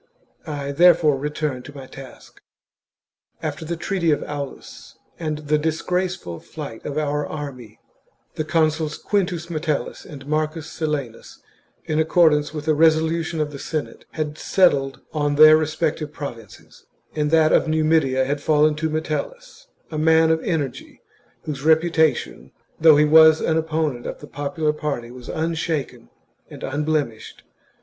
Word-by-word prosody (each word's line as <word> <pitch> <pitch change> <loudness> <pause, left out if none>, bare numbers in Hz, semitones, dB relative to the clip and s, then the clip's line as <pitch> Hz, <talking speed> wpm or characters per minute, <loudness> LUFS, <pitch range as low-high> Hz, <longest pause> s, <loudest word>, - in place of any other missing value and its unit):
I 145 -2 -4
therefore 165 -1 +5
return 145 -1 -3
to 145 +3 -12
my 135 - -8
task. 130 -1 -13 1.0
After - - -4
the 170 +2 -3
treaty 175 -1 -1
of 145 -1 +1
Aulus 145 -2 -8 0.2
and 155 -2 -2
the 150 +1 +2
disgraceful 165 - -2
flight 145 -8 -9
chap. - - -5
of - - -6
our 150 -1 0
army, 130 -7 -8 0.5
the 155 - -3
consuls 155 -1 0
Quintus 180 -5 -1
Metellus 155 -2 -3
and 140 -5 -11
Marcus 155 +1 -2
Silanus, 150 -8 -5 0.4
in 155 0 -1
accordance 160 -2 +3
with 150 0 -7
a 155 - +4
resolution 160 +1 +2
of 150 -1 -1
the 140 - -8
Senate, 155 +1 -5
had 155 -1 -4
settled 140 -8 +2
on 145 -2 0
their 155 +1 +9
respective 155 -1 -1
provinces, 120 -8 -10 0.3
and 150 -1 0
that 160 0 +4
of - - +3
Numidia 155 -4 +2
had 145 +2 -2
fallen 150 0 +3
to 160 +1 -1
Metellus, 160 - -5 0.2
a 155 - -3
man 160 +1 +4
of 160 0 +1
energy, 145 -8 -4 0.4
whose 145 -3 -5
reputation, 160 - +1 0.3
though 155 -2 +7
he 150 - +5
was 160 +1 +7
an 160 - 0
opponent 155 -5 -1
of - - -6
the - - -10
popular 150 +2 -2
party, 140 -6 -4
was 125 -1 -11
unshaken 160 - -3 0.4
and - - -11
unblemished. 145 -5 -3
155 Hz, 145 wpm, -22 LUFS, 145-160 Hz, 1.0 s, their